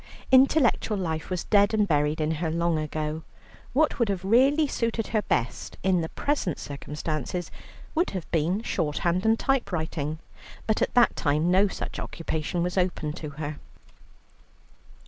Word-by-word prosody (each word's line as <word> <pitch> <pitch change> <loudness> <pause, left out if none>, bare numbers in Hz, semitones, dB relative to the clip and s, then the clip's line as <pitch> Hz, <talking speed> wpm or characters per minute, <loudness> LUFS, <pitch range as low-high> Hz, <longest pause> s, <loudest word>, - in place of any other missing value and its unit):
Intellectual 260 -5 +4
life 160 -4 -3
was 180 -2 -2
dead 205 +1 +3
and 210 -1 +2
buried 150 -1 +1
in 155 0 0
her 165 - 0
long 170 0 +1
ago. 155 +1 -3 0.5
What 300 +2 +2
would 235 -3 +2
have 190 -2 -2
really 270 +9 +4
suited 230 -4 -2
her 215 -1 +1
best 125 - -2
in 185 -2 +3
the 160 - -3
present 280 - -1
circumstances 150 +4 -4 0.4
would 340 +3 +1
have 185 -4 -5
been 170 +7 +1
shorthand 170 +2 0
and 225 0 +4
type 270 -3 0
writing, 160 -3 -2 0.5
but 220 - 0
at - - 0
that 245 -1 +5
time 155 +4 +1
no 195 +3 +5
such - - -5
occupation 165 +1 -3
was 180 +2 0
open 175 -4 -1
to 155 -2 -6
her. 150 -1 -4
180 Hz, 155 wpm, -26 LUFS, 155-220 Hz, 0.5 s, that